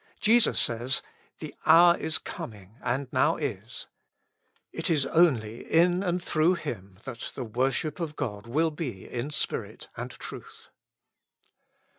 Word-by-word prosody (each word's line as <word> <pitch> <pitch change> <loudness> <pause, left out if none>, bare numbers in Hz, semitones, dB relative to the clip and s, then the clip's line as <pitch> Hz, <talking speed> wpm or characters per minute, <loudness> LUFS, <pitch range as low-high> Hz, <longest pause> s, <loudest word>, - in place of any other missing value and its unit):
Jesus 230 +2 +4
says, 120 +3 +1 0.4
The - - -6
hour 170 +2 +7
is 160 -2 -1
coming^ 100 -4 -8
and 135 +3 -1
now - - +3
is:'''' - - -4 0.9
it - - -2
is 150 -5 +3
only 130 -9 +2
in 175 +2 +4
and 180 -2 0
through 170 0 +2
Him 100 - -6
that 120 -3 -6
the 130 - -3
worship 130 +7 -1
of 160 -3 -3
God 105 -5 -4
will 160 +7 +1
be 135 - -5
in 125 +3 -4
spirit 150 - -3
and - - -5
truth. - - -10
140 Hz, 135 wpm, -28 LUFS, 115-165 Hz, 0.9 s, hour